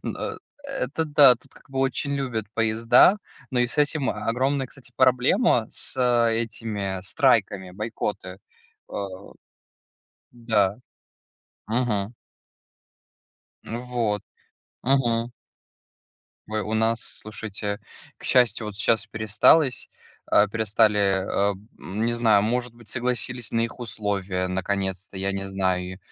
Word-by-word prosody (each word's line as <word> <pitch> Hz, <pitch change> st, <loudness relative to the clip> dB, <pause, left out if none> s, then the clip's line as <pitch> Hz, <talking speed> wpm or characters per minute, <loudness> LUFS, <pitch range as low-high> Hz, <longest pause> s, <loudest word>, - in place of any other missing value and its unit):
Н -, -, -4 dB, 0.5 s
это 165 Hz, -, -2 dB
да, 145 Hz, -4 st, +7 dB
тут, 140 Hz, -, -18 dB
как -, -, -20 dB
бы, 135 Hz, -, -4 dB
очень 135 Hz, +1 st, -1 dB
любят 125 Hz, -6 st, -2 dB
поезда, 115 Hz, -, +5 dB, 0.3 s
но 125 Hz, -, 0 dB
и 120 Hz, -, +3 dB
с 120 Hz, -, -4 dB
этим 145 Hz, -2 st, +2 dB
огромная, 130 Hz, +5 st, -1 dB
кстати, 125 Hz, -1 st, -13 dB
проблема 130 Hz, -, +3 dB
с -, -, 0 dB, 0.3 s
этими 110 Hz, -4 st, -3 dB
страйками, 100 Hz, -, +1 dB
бойкоты, 105 Hz, -2 st, -4 dB, 0.5 s
э. -, -, -10 dB, 1.4 s
Да. 110 Hz, -4 st, +1 dB, 0.9 s
Мгм. 115 Hz, -2 st, -1 dB, 1.5 s
Вот. 115 Hz, -3 st, -2 dB, 0.6 s
Мгм. 120 Hz, -3 st, +1 dB, 1.2 s
Вы 110 Hz, 0 st, -2 dB
у 110 Hz, -, -3 dB
нас, 115 Hz, +1 st, +1 dB
слушайте, 105 Hz, -1 st, -4 dB, 0.4 s
к -, -, -15 dB
счастью, 120 Hz, -3 st, +3 dB
вот 105 Hz, -, -6 dB
сейчас 115 Hz, 0 st, +1 dB
пересталось 110 Hz, +6 st, +3 dB, 0.4 s
а, 105 Hz, -, +4 dB
перестали, 110 Hz, -1 st, +2 dB, 0.3 s
а 100 Hz, +1 st, +1 dB, 0.3 s
не 110 Hz, +5 st, -2 dB
знаю, 110 Hz, -4 st, +4 dB
может 120 Hz, +2 st, -1 dB
быть, 115 Hz, -2 st, -17 dB
согласились 125 Hz, 0 st, -2 dB
на 115 Hz, -, +1 dB
их 115 Hz, +2 st, -2 dB
условия 100 Hz, -5 st, -2 dB
наконец-то, 95 Hz, 0 st, -2 dB
я 95 Hz, +1 st, -1 dB
не 100 Hz, 0 st, -3 dB
знаю. 95 Hz, -1 st, -1 dB
115 Hz, 115 wpm, -24 LUFS, 100-125 Hz, 1.5 s, да